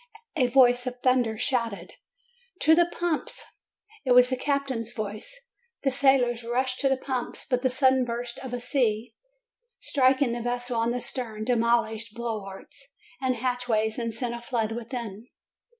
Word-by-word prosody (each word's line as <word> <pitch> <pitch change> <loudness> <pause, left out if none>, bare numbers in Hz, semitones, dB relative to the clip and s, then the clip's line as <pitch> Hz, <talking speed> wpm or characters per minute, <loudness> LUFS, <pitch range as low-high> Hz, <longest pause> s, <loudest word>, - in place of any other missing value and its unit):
A 260 -6 +3
voice 245 0 +4
of 250 0 -4
thunder 250 -4 +2
shouted: 225 -8 -2 0.7
"To 315 - +6
the 345 +1 +5
pumps!" 345 -2 -3 0.6
It 255 -3 +3
was 250 +1 +6
the - - +2
captain's 265 -4 -2
voice. 215 - -7 0.4
The 270 - +2
sailors 255 -3 +3
rushed 255 +2 -1
to 275 - +2
the 270 - +2
pumps. 260 -2 -4
But 250 -1 0
a - - +5
sudden 260 0 +3
burst 240 0 -4
of 260 - -7
the 245 0 -3
sea, 235 -3 0 0.6
striking 260 -2 +2
the 240 0 -3
vessel 245 0 -2
on 230 +1 +1
the 245 +1 -2
stern, 225 -5 -3
demolished 230 -2 +1
bulwarks 235 +4 -7 0.3
and 260 -1 +1
hatch 250 +1 -2
ways, 220 0 +1
and 230 -1 -2
sent 235 +1 -3
a 235 - -6
flood 230 -2 -1
within. 230 -2 -6
245 Hz, 160 wpm, -26 LUFS, 230-260 Hz, 0.7 s, To